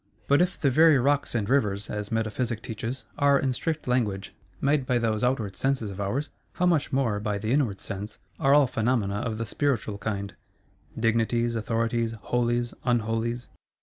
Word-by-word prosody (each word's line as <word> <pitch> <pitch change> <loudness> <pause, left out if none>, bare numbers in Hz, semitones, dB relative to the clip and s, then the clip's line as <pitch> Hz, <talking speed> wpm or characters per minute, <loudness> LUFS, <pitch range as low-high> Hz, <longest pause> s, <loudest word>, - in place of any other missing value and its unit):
—But 140 +4 +4
if 180 +1 0
the 140 - +2
very 155 +2 +6
Rocks 140 +1 +1
and 105 -4 0
Rivers 105 -7 +1
(as 105 0 -5
Metaphysic 115 +1 -1
teaches) 115 +4 -5
are, 140 -1 +5
in 135 -2 0
strict 155 +3 -3
language, 105 -6 0 0.3
made 140 -1 +1
by 125 - +2
those 110 -2 0
outward 115 -6 0
Senses 130 -6 -1
of 100 +1 -6
ours, 130 +9 -2 0.2
how 180 - 0
much 165 -5 +2
more, 130 -7 +1
by 105 0 -2
the 110 +3 -2
Inward 125 -8 +1
Sense, 100 +2 -6 0.2
are 135 +1 +5
all 145 -1 +6
Phenomena 110 -4 0
of 110 0 -2
the 115 - -2
spiritual 110 -5 -1
kind: 100 -1 -3 0.7
Dignities, 115 +1 +1
Authorities, 115 +1 0
Holies, 120 +1 -1
Unholies! 115 0 -1
115 Hz, 170 wpm, -26 LUFS, 110-135 Hz, 0.7 s, very